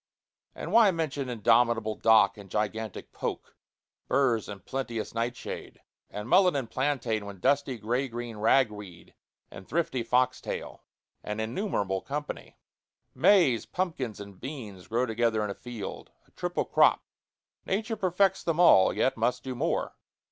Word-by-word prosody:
And - - -6
why 225 -3 +7
mention 150 -6 -2
indomitable 115 -1 +2
dock 110 -2 +4
and 100 -2 -12
gigantic 110 +1 -3
poke, - - -5 0.5
burrs 120 -6 +1
and 100 -3 -9
plenteous 120 -4 -4
nightshade, 115 +1 -4 0.3
and 105 +1 -6
mullein 180 +3 +5
and 135 -4 -1
plantain, 120 -5 -1
with 100 -2 -9
dusty 140 +2 +1
gray 120 +5 -1
green 120 -2 -6
ragweed 105 -5 0 0.4
and 95 - -11
thrifty 155 -4 -1
fox 125 +2 +1
tail? - - -6 0.4
an 105 +1 -4
innumerable 110 - -1
company. 150 +1 -6 0.6
Maize, 140 - +4
pumpkins, 160 - -3
and 100 -2 -10
beans 115 -9 -8
grow 120 +3 +1
together 115 -2 0
in 105 - -2
a - - -3
field 120 -1 -8 0.2
a - - -29
triple - - -2
crop. - - +4 0.6
Nature 215 +3 -1
perfects 190 0 +1
them 165 -1 -1
all, 130 - +7
yet 130 - +1
must 120 +2 0
do 130 - -4
more. 125 - -1
120 Hz, 140 wpm, -28 LUFS, 110-140 Hz, 0.6 s, why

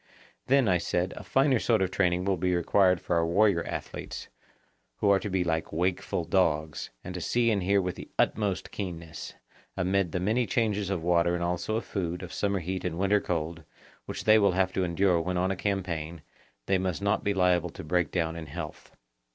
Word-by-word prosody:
Then, 135 -1 +4
I 90 -2 +3
said, 90 +2 -1
a - - -8
finer 135 -2 +3
sort 110 -4 +2
of 95 - -1
training 90 -1 +1
will 100 -1 +2
be 90 +1 0
required 90 +1 +3
for 85 - -1
our 85 - +2
warrior 95 -1 +3
athletes, - - -6 0.7
who 100 - +2
are 100 - +5
to 105 - -4
be 95 -1 +1
like 80 -2 -1
wakeful 90 0 -1
dogs, 80 -3 0
and 90 - -6
to 90 - -5
see 120 +5 +2
and 100 -3 +1
hear 100 +2 +3
with 90 -2 -2
the - - -9
utmost 100 -3 0
keenness; 85 -5 -6 0.4
amid 95 -1 +1
the 90 - -1
many 110 +6 +1
changes 105 -5 0
of 95 -4 -2
water 85 0 +3
and 85 - -2
also 90 +5 -1
of 115 - -2
food, 90 -2 -3
of 90 - -8
summer 100 -2 0
heat 90 +2 -3
and 85 -2 -3
winter 100 +2 +2
cold, 85 -2 -3 0.4
which - - -5
they 110 0 +6
will 100 -3 +3
have 95 0 +1
to 95 - 0
endure 90 0 +2
when 90 +2 -2
on 95 +1 +1
a - - -1
campaign, 85 -5 -3 0.4
they 95 -1 +2
must 95 +1 -2
not 100 +1 +1
be 100 -1 0
liable 90 -2 +2
to - - -9
break 90 -1 +1
down 80 -2 -1
in 80 -2 -7
health. 75 - -7
90 Hz, 210 wpm, -28 LUFS, 85-100 Hz, 0.7 s, they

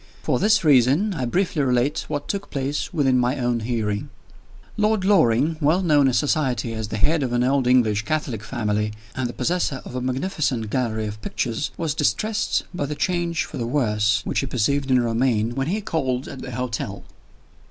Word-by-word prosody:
For - - +1
this 215 -1 +3
reason, 145 - +4
I 130 -8 -2
briefly 175 +3 0
relate 130 +2 +1
what 145 -1 -4
took 200 0 -3
place 140 +1 -2
within 135 -6 +2
my 125 +3 +1
own 120 -2 0
healing. 110 -3 -2 0.7
Lord 210 -2 +1
Loring 155 - +3
well 160 +6 +3
known 145 -5 +4
in 130 - +1
society 130 -5 0
as 110 -1 -4
the 110 - -4
head 150 +9 +2
of 125 -3 -1
an 120 0 +2
old 130 0 +2
English 115 -5 +3
Catholic 135 -4 -2
family, 105 -3 -1 0.2
and 130 -2 -2
the - - -6
possessor 170 -6 -1
of - - -9
a 125 - -2
magnificent 130 - -1
gallery 110 -3 -1
of 105 0 -6
pictures 115 +5 -2
was 160 -3 -1
distressed 215 +7 0
by 145 -5 -2
the 150 - -4
change 170 +1 0
for - - -8
the 115 - -2
worse 110 -5 +1
which - - 0
he 135 - -2
perceived 135 +4 0
in 130 -1 +4
Romayne 115 -1 +1
when 135 +2 -2
he 205 +6 -1
called 135 -9 -2
at 130 - -8
the - - -7
hotel. 115 -5 -4
130 Hz, 190 wpm, -23 LUFS, 115-155 Hz, 0.7 s, reason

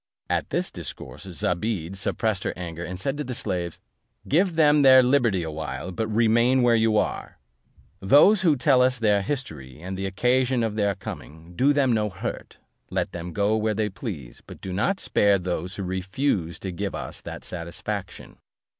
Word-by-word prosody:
At - - 0
this - - -1
discourse 65 +5 -8
Zobeide 90 0 -2
suppressed 100 +1 -1
her - - -2
anger, 85 -1 -6
and 90 +1 -6
said 135 +8 -2
to - - -1
the 125 -2 -4
slaves, 85 -5 -3 0.5
"Give 175 +4 +2
them 150 -2 +5
their 130 -1 +8
liberty 120 -8 +2
a 80 - -4
while, 80 +4 -5
but 110 +5 -2
remain 120 +3 +3
where 120 -1 +5
you 110 -1 +3
are. - - -2 0.6
Those 150 - +6
who 165 -5 +4
tell 130 0 +4
us 125 0 +3
their 105 -3 +2
history, 95 - -5
and 95 +3 -6
the 95 +1 -3
occasion 125 +5 +1
of 110 -2 -1
their 100 -2 0
coming, 80 +2 -9
do 135 +7 +4
them 140 -4 +2
no 105 -1 +1
hurt, 95 - -6 0.3
let - - -2
them 85 0 -6
go 105 +3 +1
where 110 0 0
they 105 0 0
please; 90 - -7
but - - -11
do 95 - -6
not 190 - 0
spare 100 -1 +3
those 90 0 -3
who 100 - -4
refuse 95 - -1
to 95 - -4
give 100 +3 -4
us - - -6
that - - -8
satisfaction." 90 +3 -6
105 Hz, 180 wpm, -25 LUFS, 90-125 Hz, 0.6 s, their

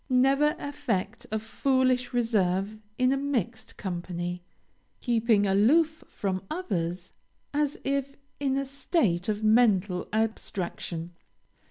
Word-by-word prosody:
Never 270 +4 +4
affect 240 -7 -3
a 220 - +1
foolish 255 +2 +1
reserve 210 -4 +1 0.2
in 255 +1 +3
a - - +1
mixed 245 -6 -2
company, 175 -1 -4 0.6
keeping 225 -4 +2
aloof 295 +12 +3
from 190 -2 -2
others 180 - -3 0.4
as 295 -1 0
if 275 0 -1 0.2
in 270 -1 +1
a 275 - -1
state 260 - 0
of 210 0 -1
mental 210 -5 +3
abstraction. 185 -6 -2
225 Hz, 110 wpm, -28 LUFS, 190-275 Hz, 0.6 s, Never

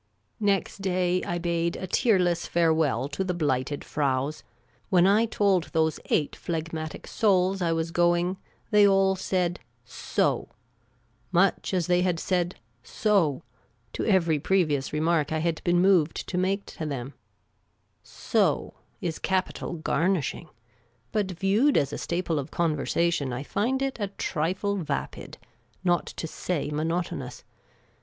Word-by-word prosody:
Next 200 -1 0
day 180 -1 +1
I 175 - -2
bade 170 -1 -1
a - - -5
tearless 180 -4 +2
farewell 160 -5 +2
to 145 +6 -2
the 180 -2 -2
Blighted 145 -3 -1
Fraus, 140 0 -1 0.5
When 180 -3 +5
I 210 +4 +4
told 200 -5 +2
those 160 -1 0
eight 150 - 0
phlegmatic 160 -1 -4
souls 195 -3 +2
I 170 -2 +1
was 165 0 -1
going, 175 +2 +2 0.3
they 210 -1 +6
all 195 -1 +4
said 180 -2 -1 0.3
"So! - - -1 0.4
" 115 +2 -39
much 195 - +1
as 180 -3 +1
they 180 +1 +2
had 180 -2 +1
said 180 0 0 0.2
" 115 - -41 0.2
So! 190 -11 +3 0.2
" 115 -1 -40
to - - -3
every 170 -7 +2
pre 190 +4 +2
vious 145 -3 -2
remark 155 -1 +1
I 160 - 0
had 165 0 -1
been 175 0 +3
moved 180 -4 +3
to - - -4
make 195 +2 0
to 155 - -6
them. 135 -1 -5 0.5
" - - -45 0.3
So - - +2
" - - -40
is 165 -2 -3
capital 190 -1 -1
garnishing; 170 0 -1 0.6
but 205 -3 0
viewed 195 - +2
as 140 0 +1
a - - -4
staple 170 -3 -1
of 140 +2 -5
conversation, 165 -2 0
I 125 +3 -4
find 245 - 0
it 270 -2 -3
a 205 - -1
trifle 190 +2 -2
vapid, 170 -6 -4 0.5
not 175 -2 +1
to - - -6
say 160 -1 -3
monotonous. 155 -5 -3
175 Hz, 150 wpm, -26 LUFS, 155-190 Hz, 0.6 s, they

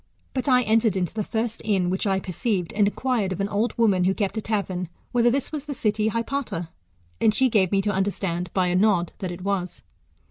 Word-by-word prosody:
But 265 +1 -1
I 250 -1 +5
entered 220 -2 +2
into 180 -3 -1
the 215 -1 -2
first 225 +2 -3
inn 190 -4 +1
which 190 +3 -1
I 190 -1 +2
perceived, 185 -1 -2
and 205 -1 +3
inquired 230 -3 0
of 185 - -3
an 195 - 0
old 215 +5 -1
woman 200 -6 +3
who 190 +1 +2
kept 200 -1 -1
a 220 - -1
tavern, 190 -5 -2 0.2
whether 240 0 +4
this 270 +2 -1
was 300 -2 -5
tlie 285 - -4
city 215 -2 0
Hypata; 230 -7 -3 0.5
and 215 - +4
she 260 +2 +4
gave 195 -6 +2
me 195 -1 +2
to 205 - +1
understand, 190 -3 -1
by 185 -1 +1
a 175 - +1
nod, 185 -3 +2
that 185 - -3
it 175 +1 -8
was. 190 -3 -2
205 Hz, 220 wpm, -24 LUFS, 185-230 Hz, 0.5 s, I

